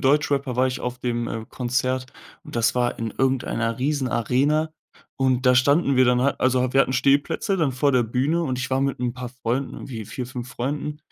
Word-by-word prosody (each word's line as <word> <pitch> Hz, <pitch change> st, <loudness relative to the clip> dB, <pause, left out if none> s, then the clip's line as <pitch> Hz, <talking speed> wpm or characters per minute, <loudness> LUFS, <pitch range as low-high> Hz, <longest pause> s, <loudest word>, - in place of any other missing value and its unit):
Deutschrapper 140 Hz, -2 st, +1 dB
war 130 Hz, +1 st, +3 dB
ich 130 Hz, -, -3 dB
auf 125 Hz, 0 st, -4 dB
dem 120 Hz, -1 st, -2 dB
äh, 115 Hz, -1 st, -4 dB
Konzert 130 Hz, +1 st, -1 dB, 0.4 s
und -, -, -8 dB
das 115 Hz, +1 st, +2 dB
war 120 Hz, -1 st, 0 dB
in 115 Hz, -2 st, -3 dB
irgendeiner 120 Hz, -3 st, 0 dB
Riesenarena. 140 Hz, +2 st, +1 dB, 0.5 s
Und 130 Hz, -1 st, +1 dB
da 125 Hz, -, +6 dB
standen 140 Hz, +3 st, +3 dB
wir 130 Hz, -, +6 dB
dann 125 Hz, 0 st, +3 dB
halt- 140 Hz, +2 st, 0 dB
also 130 Hz, 0 st, +2 dB
wir 135 Hz, -, +5 dB
hatten 130 Hz, -, +2 dB
Stehplätze- 140 Hz, +9 st, +2 dB
dann 155 Hz, -6 st, +1 dB
vor 140 Hz, +2 st, +1 dB
der 125 Hz, -1 st, +4 dB
Bühne 135 Hz, +9 st, 0 dB
und 130 Hz, -5 st, -2 dB
ich 130 Hz, -, -3 dB
war 130 Hz, +1 st, +1 dB
mit 135 Hz, -2 st, 0 dB
'n 125 Hz, -1 st, -1 dB
paar 125 Hz, -1 st, -6 dB
Freunden, 125 Hz, +2 st, -3 dB
irgendwie 115 Hz, -5 st, -7 dB
4, 125 Hz, +4 st, -6 dB
5 125 Hz, -1 st, -7 dB
Freunden 145 Hz, +4 st, -3 dB
130 Hz, 205 wpm, -23 LUFS, 125-140 Hz, 0.5 s, da